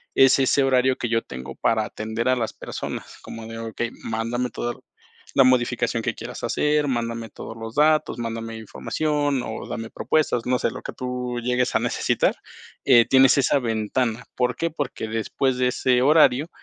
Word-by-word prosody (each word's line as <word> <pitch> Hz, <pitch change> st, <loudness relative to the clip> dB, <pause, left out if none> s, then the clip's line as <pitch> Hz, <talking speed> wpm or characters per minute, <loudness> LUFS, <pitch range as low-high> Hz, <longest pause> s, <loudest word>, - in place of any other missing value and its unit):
es 135 Hz, 0 st, +6 dB
ese 135 Hz, +1 st, +3 dB
horario 130 Hz, -1 st, +3 dB
que 120 Hz, -, -2 dB
yo 115 Hz, -1 st, +2 dB
tengo 65 Hz, +1 st, -8 dB
para 110 Hz, -2 st, +1 dB
atender 110 Hz, +2 st, -4 dB
a 130 Hz, -, +4 dB
las 115 Hz, -3 st, -2 dB
personas, -, -, -7 dB
como 115 Hz, -1 st, -9 dB
de: 115 Hz, 0 st, -7 dB
“Okey, 115 Hz, +1 st, -4 dB
mándame 115 Hz, +2 st, -2 dB
toda 120 Hz, +2 st, -3 dB, 0.6 s
la 135 Hz, -, +7 dB
modificación 125 Hz, -2 st, +1 dB
que 120 Hz, -, -1 dB
quieras 120 Hz, +2 st, -8 dB
hacer, 150 Hz, +4 st, +1 dB
mándame 115 Hz, -2 st, -2 dB
todos 115 Hz, -, -9 dB
los 115 Hz, 0 st, -7 dB
datos, 155 Hz, -3 st, +3 dB
mándame 115 Hz, -1 st, -4 dB
información 145 Hz, +4 st, -1 dB
o 110 Hz, -, -6 dB
dame 115 Hz, 0 st, -5 dB
propuestas, 150 Hz, -6 st, 0 dB
no 125 Hz, 0 st, +1 dB
sé, -, -, +1 dB
lo -, -, -9 dB
que -, -, -6 dB
tú 125 Hz, -1 st, -4 dB
llegues 125 Hz, +1 st, 0 dB
a -, -, +5 dB
necesitar”. -, -, +1 dB, 0.5 s
Eh, 120 Hz, -4 st, +7 dB
tienes 135 Hz, +1 st, +5 dB
esa 140 Hz, -, +3 dB
ventana. 115 Hz, +1 st, -1 dB
¿Por 125 Hz, -1 st, 0 dB
qué? 165 Hz, -, -1 dB
Porque 135 Hz, -7 st, -4 dB
después 125 Hz, +4 st, -1 dB
de 125 Hz, 0 st, +2 dB
ese 125 Hz, 0 st, +2 dB
horario 145 Hz, +1 st, +4 dB
125 Hz, 175 wpm, -23 LUFS, 115-130 Hz, 0.6 s, la